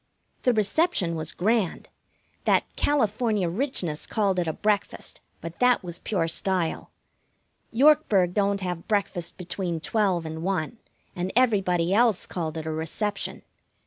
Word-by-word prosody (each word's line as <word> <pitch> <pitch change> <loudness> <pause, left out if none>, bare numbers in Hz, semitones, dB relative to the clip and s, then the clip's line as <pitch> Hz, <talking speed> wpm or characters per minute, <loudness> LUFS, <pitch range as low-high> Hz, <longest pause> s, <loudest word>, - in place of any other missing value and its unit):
The 250 - +3
reception 215 - +2
was 160 -1 -2
grand. 210 -1 0 0.6
That - - +4
California 220 -7 +1
Richness 175 - -1
called 200 -4 +1
it 175 - -1
a 160 - 0
breakfast, 210 +2 -1 0.2
but 165 0 -8
that 250 -3 +4
was 175 -1 -5
pure 185 -7 -1
style. 175 0 -1 0.8
Yorkburg 230 - +4
don't 200 0 +1
have 180 -2 -4
breakfast 200 -5 -1
between 180 -2 -3
twelve 185 -2 0
and 160 0 -5
one, 190 +3 -2 0.4
and 180 +1 -2
everybody 190 -8 +2
else 225 -2 +3
called 165 -3 -4
it 160 - -5
a 160 - -2
reception. 195 +6 -3
190 Hz, 135 wpm, -26 LUFS, 170-220 Hz, 0.8 s, That